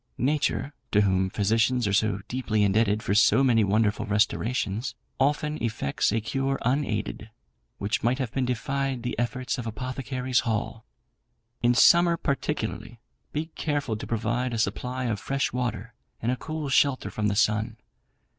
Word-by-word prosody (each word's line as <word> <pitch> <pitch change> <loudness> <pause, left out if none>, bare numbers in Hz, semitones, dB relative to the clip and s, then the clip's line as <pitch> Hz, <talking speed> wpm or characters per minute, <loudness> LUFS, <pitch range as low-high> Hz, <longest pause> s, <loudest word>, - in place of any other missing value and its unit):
Nature 145 +1 0 0.2
(to 105 - +3
whom 95 -2 +2
physicians 110 +4 +1
are 100 - 0
so 100 -1 +1
deeply 115 -4 0
indebted 105 +1 +2
for 100 - 0
so 105 +6 +5
many 115 -4 +4
wonderful 105 +1 +1
restorations), 105 +2 0 0.2
often 150 +2 0
effects 110 -12 0
a 115 - +1
cure 135 +5 -1
unaided, 135 +4 -1 0.5
which 105 +3 -1
might 120 +3 +1
have 130 -5 -3
defied 130 0 -1
the 125 - -2
efforts 125 +2 -2
of 120 - -5
Apothecaries' 130 +2 -2
Hall. 110 -4 -2 0.8
"In 120 +1 +3
summer, 170 +5 +6
particularly, 135 -5 -3 0.3
be 155 +2 -3
careful 145 -7 -1
to 105 - -7
provide 120 +2 -1
a - - -2
supply 125 +3 -2
of 115 -5 -1
fresh 135 +4 -1
water 115 -3 -3 0.3
and 120 - 0
a - - 0
cool 155 +2 -5
shelter 135 0 +2
from 105 -1 -1
the 100 - 0
sun. 110 +2 +1
120 Hz, 150 wpm, -26 LUFS, 110-135 Hz, 0.8 s, summer